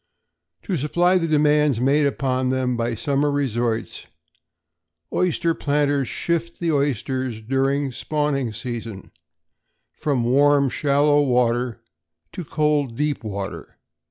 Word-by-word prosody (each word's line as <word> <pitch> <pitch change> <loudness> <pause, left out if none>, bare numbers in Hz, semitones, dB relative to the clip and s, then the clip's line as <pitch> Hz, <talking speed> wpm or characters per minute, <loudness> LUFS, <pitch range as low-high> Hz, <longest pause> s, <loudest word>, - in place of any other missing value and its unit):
To 190 -5 -2
supply 175 +6 +2
the 165 - -1
demands 150 -4 +3
made 140 +3 +3
upon 130 -2 -1
them 130 -1 0
by 115 0 -1
summer 140 +5 0
resorts, 120 -5 -2 1.1
oyster 170 -2 +1
planters 145 -3 0
shift 170 +4 -2
the 170 -1 0
oysters, 130 -4 -1
during 135 +4 0
the - - -10
spawning 145 -4 -1
season, 115 -3 -7 0.8
from 140 -5 -1
warm 140 +3 +4
shallow 145 +2 +2
water 120 -3 +1 0.5
to 180 - -6
cold 150 -6 0
deep 150 -3 -1
water. 100 -2 -6
140 Hz, 115 wpm, -22 LUFS, 120-150 Hz, 1.1 s, warm